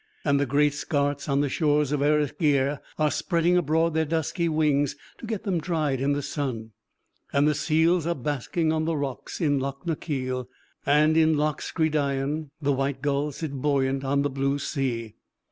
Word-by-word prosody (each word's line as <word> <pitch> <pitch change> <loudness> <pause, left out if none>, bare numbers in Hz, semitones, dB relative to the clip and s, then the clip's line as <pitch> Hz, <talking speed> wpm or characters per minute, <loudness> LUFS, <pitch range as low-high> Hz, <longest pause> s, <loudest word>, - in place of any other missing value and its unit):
And 140 -1 +3
the 140 - +1
great 145 +2 +3
skarts 145 -1 -1
on 140 0 +2
the 145 - +1
shores 150 -1 +1
of 145 -2 0
Erisgeir 145 -1 +2 0.2
are 150 -1 +2
spreading 175 -1 +1
abroad 165 0 +2
their 160 0 +2
dusky 165 +2 -1
wings 150 -3 +1 0.2
to 230 - -8
get 215 -3 -3
them 185 -6 0
dried 150 -6 -1
in 140 +1 +2
the 145 0 -2
sun; 120 -8 -4 0.6
and 140 +1 +3
the 150 - +3
seals 160 +3 +2
are 170 - 0
basking 150 +4 -1
on 160 0 0
the 165 -1 0
rocks 140 -3 -4
in 145 -4 +2
Loch 140 +3 -5
na 170 - 0
Keal; 130 -5 -3 0.4
and 150 +2 +4
in 160 -1 +4
Loch 150 -1 0
Scridain 150 -1 -1
the 145 -2 +1
white 135 +1 -2
gulls 145 0 0
sit 160 -3 -4
buoyant 135 -1 0
on 140 +1 +1
the 145 - 0
blue 135 +1 0
sea. 125 -6 -3
145 Hz, 180 wpm, -26 LUFS, 140-160 Hz, 0.6 s, and